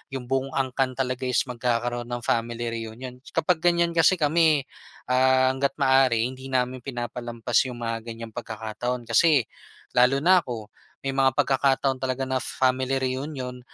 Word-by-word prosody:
'yong 130 -2 -5
buong 135 0 0
angkan 130 -1 0
talaga 130 -1 -2
is 125 - +2
magkakaroon 120 -1 -2
ng 120 -1 -4
family 115 0 -1 0.2
reunion. 125 +3 -8 0.2
Kapag 175 +1 +2
ganyan 170 0 +2
kasi 165 +2 +4
kami, 155 -1 +3 0.5
ah, 130 0 +4
hangga't 135 +1 -1
maaari 130 -4 +4
hindi 130 +1 -6
namin 130 0 0
pinapalampas 120 -2 -2
yung 120 -1 -7
mga 115 0 -2
ganyang 115 0 -8
pagkakataon. 120 +1 -4
Kasi 135 +4 +4 0.5
lalo 125 +3 +3
na 185 +2 +6
ako, 115 -7 -7 0.3
may 135 - -1
mga 135 -1 +2
pagkakataon 135 0 +2
talaga 130 0 -2
na 130 0 -1
family 130 +1 0
reunion, 130 -1 -3
130 Hz, 150 wpm, -25 LUFS, 120-135 Hz, 0.5 s, na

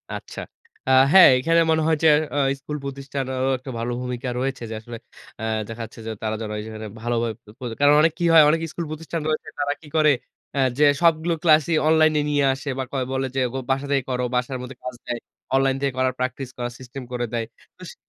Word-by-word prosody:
আচ্ছা। - - -7 0.5
আ - - +4 0.2
হ্যাঁ, 190 -1 +10
এখানে 165 +5 +3
মনে 160 0 +2
হয় 160 -1 +3
যে, - - +6 0.3
অ - - 0 0.2
স্কুল 150 +2 -5
প্রতিষ্ঠানেরও 135 -1 -3
একটা 130 +1 -8
ভালো 120 +1 -2
ভূমিকা 125 +1 -4
রয়েছে 130 -2 -3
যে, 110 - -5
আসলে, 120 +1 -9 0.4
অ্যা 110 - -4 0.2
দেখাচ্ছে 115 0 -8
যে, - - -2
তারা 110 0 -2 0.3
যেখানে 110 0 -7
ভালোভাবে 115 -1 -1 0.3
পড় 120 -3 -5
কারণ 145 +1 +6
অনেক 160 0 +3
কি 175 - +1
হয়? 160 -2 +9
অনেক 160 +1 +2
স্কুল 170 - -4
প্রতিষ্ঠান 165 +1 -5
রয়েছে, 155 0 -2
তারা 145 0 0
কি 155 - -14
করে? 155 -1 +5 0.4
অ্যা 140 - 0 0.2
যে, 150 - +5 0.2
সবগুলো 170 0 +3
ক্লাসই 160 0 +4
অনলাইনে 155 -1 +4
নিয়ে 145 -1 +2
আসে 135 +2 -6
বা - - 0
কয় 130 -2 -1
বলে 135 0 -1
যে, - - +1
গো - - -3
"বাসা 135 +1 0
থেকে 135 -2 +2
করো।" 125 0 -1
বাসার 125 +1 -1
মধ্যে 125 +1 -8
কাজ 125 -1 -5
দেয়। 120 -1 -3 0.4
অনলাইন 135 0 +3
থেকে 140 -2 0
করার, 130 -1 +1
প্র্যাকটিস 130 0 -3
করার 120 -1 -3
সিস্টেম 130 +1 -8
করে 120 0 -1
দেয়। 115 -1 -1 0.3
তো - - -13
সে - - -15
135 Hz, 210 wpm, -23 LUFS, 125-155 Hz, 0.5 s, হ্যাঁ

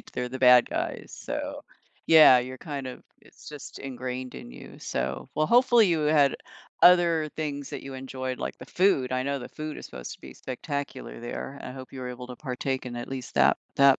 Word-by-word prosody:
right? - - -18
They're 125 0 -3
the 130 - -6
bad 125 -1 +7
guys, - - -3
so, - - -4 0.4
yeah, 155 -5 +9
you're 130 +1 -4
kind 145 -5 -5
of 130 - -8 0.2
it's - - -15
just 150 -2 -9
ingrained 130 -1 -5
in - - -9
you, - - -12
so, - - -3
well, 155 - +2
hopefully 240 -3 +6
you 165 -2 +2
had 150 -2 +4 0.5
other 170 -3 +6
things 145 -3 -4
that - - -6
you 135 0 -8
enjoyed, 130 -1 -5
like - - -4
the 125 - -10
food, 175 -7 +2
I 130 0 0
know 140 0 -1
the 125 - -7
food 155 -1 -6
is - - -8
supposed 65 -1 -8
to - - -13
be 65 -1 -11
spectacular 135 +1 -5
there, 125 +3 -6
I 125 - -6
hope 130 0 -10
you 135 - -8
were 125 - -4
able 125 0 -8
to 125 - -8
partake 130 -1 -3
in 120 - -6
at 120 0 -5
least 130 -2 -6
that - - +5 0.2
that 140 -1 +6
130 Hz, 215 wpm, -27 LUFS, 125-150 Hz, 0.5 s, yeah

